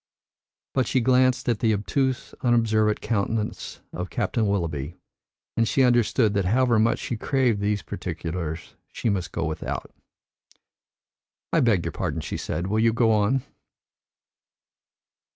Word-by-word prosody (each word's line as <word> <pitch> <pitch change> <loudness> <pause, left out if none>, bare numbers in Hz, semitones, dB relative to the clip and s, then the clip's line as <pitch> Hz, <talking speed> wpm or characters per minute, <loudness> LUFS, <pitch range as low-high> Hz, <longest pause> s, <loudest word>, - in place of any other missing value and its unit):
But 130 -4 +1
she 130 - +2
glanced 130 +1 +3
at 115 -3 +1
the 110 -2 +2
obtuse, 130 +5 -1
unobservant 110 -3 +2
countenance 110 0 -2
of 90 +1 -4
Captain 110 -3 0
Willoughby, 85 -6 -2 0.6
and 115 0 +2
she 135 - +3
understood 120 -2 +3
that 100 -2 +1
however 120 +3 +3
much 115 +2 +3
she 120 - -4
craved 125 -2 +1
for - - -5
these 100 -2 0
particulars, 80 0 -5 0.2
she 115 - -2
must 95 -4 -2
go - - -2
without. 80 -1 -4 1.6
"I - - +4
beg 110 -8 +2
your - - -2
pardon," - - -3
she - - -5
said. 85 - -3
"Will 105 +3 0
you 115 0 +3
go 115 -1 +3
on?" 110 +5 +2
110 Hz, 140 wpm, -25 LUFS, 100-120 Hz, 1.6 s, I